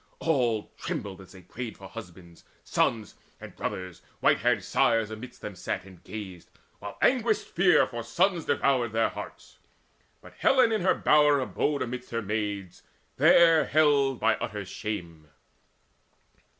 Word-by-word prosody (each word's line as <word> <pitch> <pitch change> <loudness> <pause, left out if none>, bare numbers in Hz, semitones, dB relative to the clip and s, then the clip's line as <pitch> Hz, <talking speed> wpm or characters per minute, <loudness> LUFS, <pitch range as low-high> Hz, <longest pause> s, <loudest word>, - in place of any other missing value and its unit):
All 120 -9 0
trembled 95 -1 -5
as 95 - -15
they 95 -1 -14
prayed 115 +5 -7
for 95 - -11
husbands, 90 -5 -12 0.2
sons, 110 -3 0 0.3
And - - -11
brothers: 90 -2 -5 0.2
white - - +3
haired - - +1
sires 115 -2 +1
amidst 120 +3 -9
them 105 - -7
sat, 90 - -4
And 95 -3 -16
gazed, 95 -5 -9 0.3
while 100 0 -8
anguished 235 -4 +2
fear 180 +1 +4
for 120 -2 -6
sons 170 - 0
devoured 125 -5 +1
Their 115 0 +2
hearts. - - -10 0.6
But - - -15
Helen 260 -4 +4
in 220 - 0
her 185 - +3
bower 150 -1 +4
abode 135 +5 -1
Amidst 125 +1 -6
her 115 -1 -3
maids, 105 -3 -4 0.4
there 165 -3 +6
held 140 -4 +3
by - - +2
utter - - -5
shame. 85 -7 -6
115 Hz, 145 wpm, -27 LUFS, 100-145 Hz, 0.6 s, there